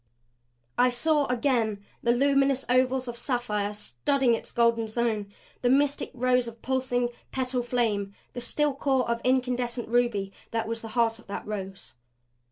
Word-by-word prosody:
I 250 Hz, +1 st, +6 dB
saw 295 Hz, +4 st, +2 dB
again 230 Hz, -5 st, 0 dB, 0.2 s
the 235 Hz, -, +3 dB
luminous 275 Hz, +1 st, +3 dB
ovals 255 Hz, +1 st, +2 dB
of 240 Hz, -, -4 dB
sapphire, 235 Hz, -5 st, -1 dB
studding 235 Hz, -, +1 dB
its 230 Hz, -, -3 dB
golden 235 Hz, -1 st, +2 dB
zone, 220 Hz, -3 st, -1 dB, 0.3 s
the 245 Hz, -, +2 dB
mystic 285 Hz, +2 st, +2 dB
rose 250 Hz, 0 st, +2 dB
of 230 Hz, 0 st, -10 dB
pulsing, 255 Hz, -2 st, 0 dB, 0.2 s
petal 255 Hz, -1 st, -1 dB
flame, 220 Hz, -5 st, -1 dB, 0.2 s
the 245 Hz, -, -5 dB
still 295 Hz, +4 st, +1 dB
core 270 Hz, -2 st, +1 dB
of 235 Hz, 0 st, -1 dB
incandescent 250 Hz, -1 st, 0 dB
ruby 230 Hz, -5 st, +1 dB, 0.2 s
that 225 Hz, -1 st, -2 dB
was 230 Hz, 0 st, -3 dB
the 225 Hz, -, -7 dB
heart 225 Hz, -1 st, +2 dB
of -, -, -18 dB
that 200 Hz, -, -5 dB
rose. 195 Hz, -2 st, -6 dB
245 Hz, 155 wpm, -27 LUFS, 225-255 Hz, 0.3 s, I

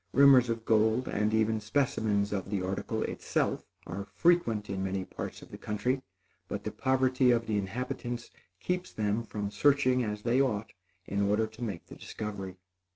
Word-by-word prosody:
Rumors 135 Hz, -3 st, +7 dB
of 115 Hz, -1 st, -2 dB
gold, 110 Hz, +3 st, +3 dB
and 105 Hz, +1 st, 0 dB
even 110 Hz, 0 st, +2 dB
specimens 110 Hz, -4 st, 0 dB
of 100 Hz, -1 st, -3 dB
the 100 Hz, -2 st, -1 dB
article 95 Hz, +1 st, -2 dB
itself, -, -, -1 dB, 0.2 s
are 100 Hz, +3 st, -5 dB
frequent 120 Hz, -12 st, +3 dB
in 95 Hz, -1 st, -3 dB
many 95 Hz, 0 st, -2 dB
parts -, -, -7 dB
of -, -, -15 dB
the -, -, -9 dB
country; 125 Hz, +6 st, -1 dB, 0.5 s
but 100 Hz, -, -4 dB
the 105 Hz, -, -3 dB
poverty 130 Hz, 0 st, +2 dB
of 115 Hz, -1 st, +3 dB
the 105 Hz, -2 st, 0 dB
inhabitants 120 Hz, +3 st, -4 dB, 0.3 s
keeps 180 Hz, 0 st, -2 dB
them 105 Hz, +1 st, 0 dB
from 105 Hz, -3 st, -4 dB
searching 130 Hz, +2 st, +3 dB
as 105 Hz, -1 st, -4 dB
they 125 Hz, +3 st, +3 dB
ought 110 Hz, -6 st, -1 dB, 0.3 s
in 100 Hz, 0 st, -1 dB
order 105 Hz, +2 st, +2 dB
to 110 Hz, +2 st, -9 dB
make 100 Hz, -7 st, -4 dB
the -, -, -11 dB
discovery. 100 Hz, -3 st, -6 dB
110 Hz, 170 wpm, -30 LUFS, 100-125 Hz, 0.5 s, Rumors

